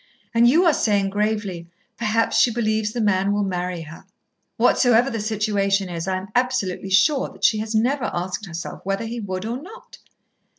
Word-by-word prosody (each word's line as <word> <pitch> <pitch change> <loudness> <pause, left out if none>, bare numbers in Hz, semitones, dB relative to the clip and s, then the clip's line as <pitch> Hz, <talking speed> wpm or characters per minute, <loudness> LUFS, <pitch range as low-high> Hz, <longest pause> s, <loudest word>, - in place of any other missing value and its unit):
And 235 +1 +5
you 335 +8 +4
are 335 - +5
saying 200 -5 +1
gravely, 205 -4 -2 0.3
'Perhaps 225 0 0
she 240 - +4
believes 220 -2 0
the 240 - -4
man 200 -2 +2
will 205 0 +1
marry 180 -2 -3
her.' 160 +1 -12 0.5
Whatsoever 245 +1 +4
the 225 - -3
situation 205 -2 0
is, 170 0 -5
I 190 -1 0
am 190 +1 -8
absolutely 245 -7 -1
sure 265 +9 +3
that - - -17
she 215 - +4
has 220 +1 -3
never 250 +4 +1
asked 185 +3 -4
herself 170 0 -7
whether 195 +3 -2
he 235 +1 -5
would 190 -2 -4
or 240 +4 -4
not." 430 +9 -13
210 Hz, 180 wpm, -22 LUFS, 190-235 Hz, 0.5 s, And